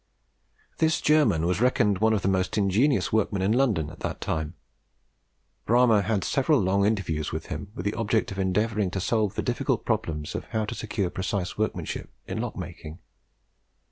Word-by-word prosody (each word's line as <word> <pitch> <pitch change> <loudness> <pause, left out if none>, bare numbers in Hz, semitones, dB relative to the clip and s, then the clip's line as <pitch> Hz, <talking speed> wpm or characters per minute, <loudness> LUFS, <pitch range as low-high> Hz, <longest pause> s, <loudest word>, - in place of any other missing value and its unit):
This 160 0 +3
German 125 - +3
was 90 +3 0
reckoned 115 -6 +3
one 110 +1 +3
of 105 - 0
the - - +1
most 95 0 0
ingenious 105 +8 +2
workmen 100 -3 +1
in 100 - +2
London 110 - +1
at - - -13
the - - -3
time. 80 +2 -3 1.1
Bramah 115 -2 +5
had 100 0 0
several 140 +1 +2
long 100 +1 +2
interviews 85 -8 -1
with - - -4
him, 100 - -7
with 90 - -6
the 105 - 0
object 110 -2 0
of 95 - -5
endeavouring 105 +2 +1
to 95 - -3
solve 105 +1 0
the - - -1
difficult - - -1
problem 75 -2 -1
of - - -4
how 110 -1 -2
to 110 - -5
secure 105 -5 -2
precise 95 -1 -2
workmanship 110 0 -3 0.2
in - - -3
lock - - -4
making. 75 +2 -8
105 Hz, 175 wpm, -26 LUFS, 95-115 Hz, 1.1 s, Bramah